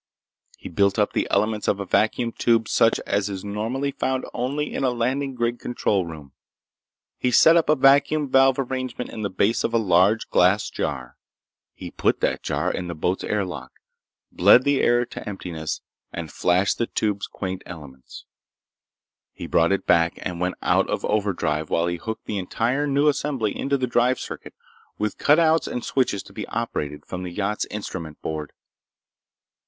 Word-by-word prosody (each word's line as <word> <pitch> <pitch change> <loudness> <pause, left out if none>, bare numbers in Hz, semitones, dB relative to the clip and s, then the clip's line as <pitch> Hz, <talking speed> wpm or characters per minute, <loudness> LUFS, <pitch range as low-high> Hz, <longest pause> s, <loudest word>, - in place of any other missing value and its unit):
He - - -9
built 100 +3 +1
up 105 -1 +1
the - - 0
elements 105 +1 0
of 100 - +1
a 100 - -3
vacuum 115 +4 +1
tube 115 -1 +1
such 115 - +3
as 100 0 -1
is 95 0 -6
normally 115 +7 -2
found 130 -1 -2
only 140 +5 -2
in - - -2
a 130 - +3
landing 130 +3 -1
grid 120 0 -1
control 100 -6 -1
room. 75 -4 -10 0.9
He 125 - +1
set 160 +6 +6
up 165 -3 +2
a 155 - +5
vacuum 145 +2 +4
valve 135 0 +4
arrangement 130 -2 -4
in 110 - -6
the 100 - -1
base 100 +4 +1
of 115 - -1
a - - +5
large 100 +1 +3
glass - - +3
jar. 65 -4 -4 0.6
He - - -8
put - - 0
that - - 0
jar - - -1
in 90 - -4
the 85 - -5
boat's 90 +4 -1
air 105 -2 -1
lock, 65 -8 -8 0.6
bled 100 +7 +6
the 140 0 +2
air 120 0 +3
to 115 - -8
emptiness, 85 -6 -5 0.3
and 80 -3 -6
flashed 90 +3 +1
the 115 - 0
tube's 105 -2 -1
quaint 95 -1 -5
elements. 70 -6 -11 1.1
He - - -8
brought 85 +2 +2
it 100 - 0
back 85 0 +3
and 90 -1 -4
went 90 +1 -1
out - - +2
of - - -2
overdrive 95 -7 -1
while 85 - +1
he 85 0 -2
hooked 110 +3 -6
the 105 - -3
entire 120 +9 -1
new 140 +1 +2
assembly 140 -7 0
into 140 0 0
the 130 - 0
drive 125 +1 +2
circuit, - - -8 0.4
with 105 0 -3
cut 150 +1 +5
outs 160 -1 +3
and 125 - -4
switches 125 -7 0
to 100 - -16
be - - -6
operated 75 -10 -4
from 90 - -6
the 90 -1 -5
yacht's 105 +3 -2
instrument 85 -7 -6
board. 75 -2 -4
105 Hz, 180 wpm, -23 LUFS, 90-125 Hz, 1.1 s, set